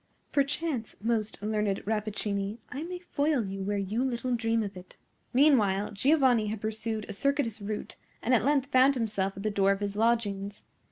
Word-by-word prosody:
Perchance, 280 -4 -1
most 220 -2 -1
learned 210 -2 -1
Rappaccini, 210 -1 -2
I 280 - -5
may 360 +3 -5
foil 295 - 0
you 195 0 -5
where 205 +1 -1
you 205 +5 -1
little 250 -1 -1
dream 225 -1 +1
of 200 -1 -6
it!" 180 0 -12 0.3
Meanwhile 215 -8 +4
Giovanni 255 -1 +3
had 215 0 -3
pursued 220 0 -3
a 205 - -5
circuitous 260 -2 0
route, 210 +1 -5 0.3
and 250 - +2
at 225 -4 +4
length 280 0 +1
found 265 +1 +5
himself 200 -5 -1
at 195 - -6
the 215 - 0
door 195 -1 +3
of 195 - -5
his 205 -1 -3
lodgings. 205 -3 0
220 Hz, 175 wpm, -29 LUFS, 205-255 Hz, 0.3 s, found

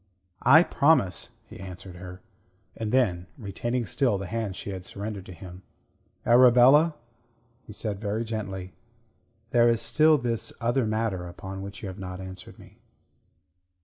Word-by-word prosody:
"I 160 +4 +7
promise," 140 - +2 0.2
he - - -13
answered 90 -1 -9
her. 90 0 -10 0.5
And 110 -2 -4
then, 95 -9 +1
retaining 120 +2 -3
still 120 -3 +1
the 95 - -5
hand 110 -1 -3
she 100 - -6
had 95 -2 -6
surrendered 100 0 -6
to - - -9
him 90 +1 -11 0.6
"Arabella," 125 +6 +6 0.7
he - - -9
said 105 -1 -4
very 110 +2 -2
gently, 95 -5 -5 0.8
"there 120 -1 +5
is 115 -1 +2
still 150 +7 +4
this 120 -3 -2
other 120 +1 +1
matter 110 -5 -2
upon 95 +2 -8
which 100 +3 -9
you - - -4
have 95 +1 -8
not 90 -1 -6
answered 95 0 -10
me." - - -17
105 Hz, 145 wpm, -26 LUFS, 95-120 Hz, 0.8 s, I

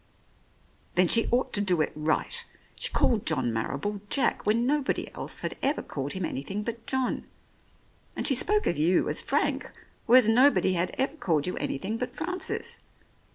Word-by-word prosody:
"Then 180 0 +4
she 230 +6 +4
ought 245 +2 0
to 205 - +2
do 185 -4 +1
it 155 - +1
right. 155 +1 0 0.3
She - - 0
called 225 -4 +2
John 130 -7 0
Marrible, 140 - -3
Jack, 275 - 0
when 230 +3 +2
nobody 285 +1 -1
else - - -4
had - - -3
ever 285 +3 0
called 140 0 -3
him 190 -2 -2
anything 190 +11 -4
but 230 +1 -6
John; 265 -1 -1 0.9
and - - -2
she 275 - +4
spoke 420 - +3
of 170 - 0
you 170 +4 +3
as - - +1
Frank, - - -1 0.4
whereas 245 -1 +7
nobody 240 -4 +4
had 175 0 -1
ever 270 +3 0
called 160 - 0
you 180 - -2
anything 210 +11 -3
but 250 +1 -4
Francis. 365 +4 -3
210 Hz, 170 wpm, -27 LUFS, 170-255 Hz, 0.9 s, whereas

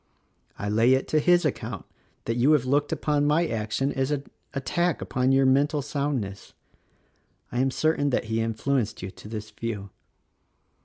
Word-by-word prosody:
I 105 - -4
lay 115 +5 +4
it 130 - -2
to 155 - +3
his 175 +2 +4
account 115 - -3 0.4
that 115 - 0
you 125 +6 +4
have 140 -5 +3
looked 145 +3 +1
upon 145 -1 +1
my 160 +3 +3
action 115 +3 -1
as 135 0 0
an 145 -2 -1 0.3
attack 155 +5 0
upon 130 +1 0
your 135 0 +4
mental 140 +2 +3
soundness. 140 -9 -3 1.0
I 120 - -2
am 135 +1 +3
certain 145 +1 +1
that 130 - +1
he 110 0 -1
influenced 115 0 -1
you 95 - -5
to - - -13
this 105 -1 -6
view. 105 -4 -5
130 Hz, 165 wpm, -26 LUFS, 115-145 Hz, 1.0 s, lay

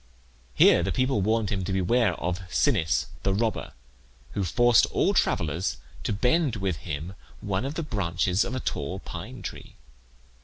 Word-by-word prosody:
Here - - +6
the - - -1
people 130 -4 +1
warned 110 +2 +1
him 95 -2 -1
to 90 - -3
beware 100 +5 +2
of 90 +1 -2
Sinnis 80 - +2 0.2
the 95 -1 +1
robber, 110 +1 -1 0.6
who 100 - -2
forced 120 +6 +4
all - - +1
travellers 85 +2 0 0.3
to - - -1
bend 125 +6 +2
with 95 -5 -2
him 80 +3 -5 0.3
one 100 +3 -2
of 140 +3 -4
the 165 - -2
branches 95 - 0
of 125 - -4
a - - -1
tall 85 - -3
pine 100 +5 -8
tree. - - -8
100 Hz, 160 wpm, -26 LUFS, 90-120 Hz, 0.6 s, Here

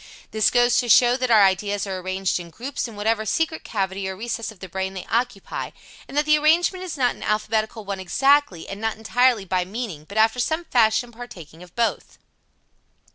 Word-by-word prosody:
This 220 -1 +3
goes 245 0 +3
to 245 - -2
show 240 +2 +6
that 255 -1 -1
our 220 -3 +6
ideas 200 +2 0
are 190 -2 -4
arranged 185 0 -1
in 170 -1 -9
groups 255 - -5
in 230 - -11
whatever 215 +1 0
secret 320 +9 -1
cavity 195 -2 -3
or 190 - -5
recess 230 +1 -4
of 210 - -17
the 190 - -8
brain 190 +2 -4
they 185 - -6
occupy, 235 -3 -2 0.4
and 280 - -7
that 295 - +3
the 305 0 +4
arrangement 345 +4 +2
is 345 -5 -6
not 250 -2 +2
an - - -16
alphabetical 215 +1 -1
one 195 -1 -4
exactly, 270 - +2
and 200 +2 -7
not 225 0 -1
entirely 235 -1 +2
by 185 0 0
meaning, 190 -6 -6
but 200 - -7
after 220 +3 +3
some 315 +7 -1
fashion 235 -2 +2
partaking 195 -10 -11
of 180 -1 -15
both. 235 -1 -1
220 Hz, 200 wpm, -23 LUFS, 195-245 Hz, 0.4 s, show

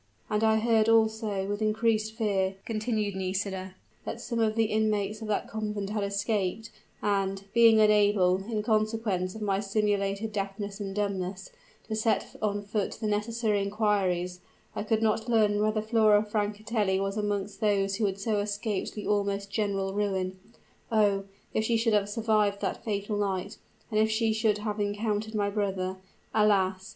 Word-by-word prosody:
"And 210 +1 +1
I 220 0 +4
heard 225 0 +3
also, 220 -3 +2
with 205 +2 -3
increased 220 0 +1
fear," 195 -4 0
continued 215 -2 -1
Nisida, 190 0 -3 0.3
"that - - -5
some 235 -2 -3
of 220 -1 +2
the 225 - +3
inmates 215 -1 0
of 220 - -5
that 210 - -1
convent 210 -2 -3
had 210 -1 -1
escaped; 200 +1 -1 0.3
and, 195 -1 0
being 230 -1 +6
unable, 205 -3 +4
in 215 -1 -1
consequence 215 -4 0
of 220 - -5
my 195 -2 +1
simulated 205 0 0
deafness 200 0 -4
and 195 -1 -5
dumbness, 190 -2 -3 0.4
to 220 - -2
set 220 +1 0
on 205 -1 -1
foot 205 0 -2
the 220 - -6
necessary 210 0 0
inquiries, 195 -4 0 0.4
I - - -2
could 220 +1 0
not 220 +1 +1
learn 210 -3 +3
whether 215 0 +1
Flora 215 -2 +4
Francatelli 210 -1 -1
was 195 0 -2
amongst 205 -1 -2
those 195 -2 +1
who 220 - +1
had 195 -1 -2
so 210 +1 0
escaped 205 0 -2
the 210 - -5
almost 200 -1 0
general 195 -3 -1
ruin. 190 -2 -1 0.5
O! 205 -3 +3 0.3
if 220 - +1
she 230 0 +2
should 225 0 +1
have 205 -1 +2
survived 210 -2 +1
that - - -3
fatal 205 -1 -2
night 190 -3 -2 0.3
and 215 - +2
if 220 0 +3
she 220 0 +1
should 215 -1 +2
have 210 0 -3
again 205 0 0
encountered 215 0 -2
my 205 -1 +1
brother! 190 -2 -2 0.4
Alas! 195 -2 +2
210 Hz, 165 wpm, -28 LUFS, 200-220 Hz, 0.5 s, being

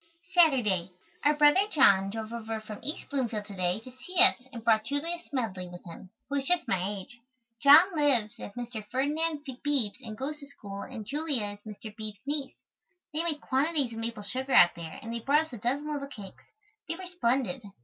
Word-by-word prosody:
Saturday. 245 - +3 0.3
Our 295 +1 +4
brother 300 +7 +5
John 200 - +4
drove 220 +2 -6
over 225 -1 -4
from 215 -1 -9
East 300 - -4
Bloomfield 235 -7 -1
to 205 -1 -10
day 180 +1 0
to 255 - -12
see 255 +9 -11
us 260 -10 +4
and 230 -4 -8
brought 220 -2 +3
Julia 310 +6 -1
Smedley 215 - -3
with 175 0 -11
him, 175 +2 -11 0.2
who 285 +1 -2
is 275 -1 -2
just 355 -1 +2
my 185 -1 0
age. 205 +4 -7 0.4
John 320 +6 +8
lives 265 -8 +3
at 200 - -9
Mr. 240 -3 -6
Ferdinand 295 +4 0
Beebe's 265 -4 0
and 220 -2 -7
goes 295 +4 -4
to 280 - -12
school 200 -7 -9
and 230 -5 -7
Julia 285 -3 0
is 205 0 -10
Mr. 215 0 -10
Beebe's 215 -3 -7
niece. 285 -1 0 0.6
They 310 - 0
make 315 -3 -1
quantities 275 -2 +1
of 225 - -6
maple 225 -2 -4
sugar 260 +5 -3
out 175 -1 +7
there 165 -2 -8
and 230 +1 -6
they 235 - -3
brought 290 +7 +2
us 315 - -16
a - - -5
dozen 285 +7 -1
little 280 -1 -4
cakes. 205 -8 -11 0.4
They 330 - -1
were 370 +2 -8
splendid. 255 - 0
250 Hz, 200 wpm, -29 LUFS, 215-290 Hz, 0.6 s, John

